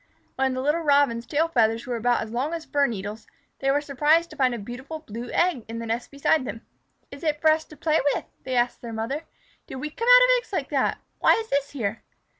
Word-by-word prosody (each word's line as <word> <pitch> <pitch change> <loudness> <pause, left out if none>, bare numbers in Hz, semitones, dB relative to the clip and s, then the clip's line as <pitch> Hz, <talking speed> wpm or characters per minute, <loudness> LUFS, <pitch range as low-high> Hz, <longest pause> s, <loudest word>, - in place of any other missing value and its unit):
When 265 -1 0
the 255 - -2
little 300 +4 +1
Robins' 280 -6 +2
tail 315 +3 +1
feathers 230 -6 +1
were 245 - -3
about 240 0 +1
as 220 - -9
long 270 +8 -1
as 330 - -7
fir 285 -1 +2
needles, 210 -1 -6 0.3
they 270 - 0
were 285 +2 +2
surprised 300 +4 +2
to - - -10
find 260 -4 +2
a - - -4
beautiful 250 +8 -7
blue 235 -3 -7
egg 345 -9 +1
in 225 +1 -6
the 230 - -5
nest 230 +2 -3
beside 280 +1 +1
them. 230 -2 -7 0.5
"Is 280 - -10
it 300 -2 0
for 315 0 +5
us 315 0 0
to 305 - -15
play 310 +1 +2 0.2
with?" - - -4 0.2
they 260 -1 -3
asked 240 0 +1
their 235 -2 -7
mother. 255 +8 -3 0.4
"Did - - -8
we 300 +4 -5
come 465 +9 -4
out - - +9
of - - +4
eggs 480 - -16
like - - -2
that? - - +1 0.2
Why - - +5
is 445 0 -3
this 280 0 +1
here?" 225 -5 -3
270 Hz, 240 wpm, -25 LUFS, 235-305 Hz, 0.5 s, out